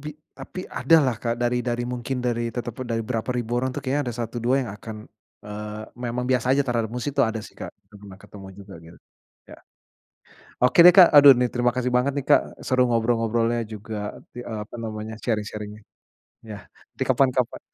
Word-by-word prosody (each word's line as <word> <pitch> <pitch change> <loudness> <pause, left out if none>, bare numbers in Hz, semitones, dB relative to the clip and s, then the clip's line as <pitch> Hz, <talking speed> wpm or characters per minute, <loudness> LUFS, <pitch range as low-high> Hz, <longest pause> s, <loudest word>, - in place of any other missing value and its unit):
bi 150 - -6 0.2
tapi 185 - -8
ada 165 - +3
lah, 125 -3 +1
Kak, 115 -1 -1
dari 120 0 0
dari 120 -1 -2
mungkin 125 +1 -4
dari 120 -1 -2
teteput 120 +1 -5 0.2
berapa 115 0 -3
ribu 120 -2 -3
orang 130 +1 -1
tuh - - -6
kayaknya 135 -1 -2
ada 115 - -7
satu 115 +1 -5
dua 125 +3 +2
yang - - -6
akan, 110 0 -10 0.4
eee, 105 +1 -7
memang 125 0 -4
biasa 125 -1 +1
aja 140 +2 +3
terhadap 115 -3 -1
musik 125 +4 -4
tuh - - +3
ada 110 -1 0
sih, 105 - -11
Kak, - - -8 0.2
udah 105 0 -16
pernah 95 -2 -12
ketemu 100 -2 -13
juga 100 -1 -12
gitu. 85 +1 -15 0.5
Ya - - -13 1.1
Oke 125 +7 +3
deh, - - +12
Kak, 180 -3 +10
aduh 145 -1 +10
nih 125 0 +1
terima 120 0 +2
kasih 125 0 -1
banget 125 +3 +2
nih, 140 - -3
Kak, - - +6 0.2
seru 130 -1 +2
ngobrol-ngobrolnya 115 0 +1
juga 105 0 -6 0.2
ti 120 - -8
apa 110 -2 -7
namanya, 110 0 -6
sharing-sharing-nya. 105 -2 -4 0.7
Yah, 105 -1 -8 0.4
di - - 0
kapan-kapan. 130 -3 +1
120 Hz, 190 wpm, -24 LUFS, 110-125 Hz, 1.1 s, deh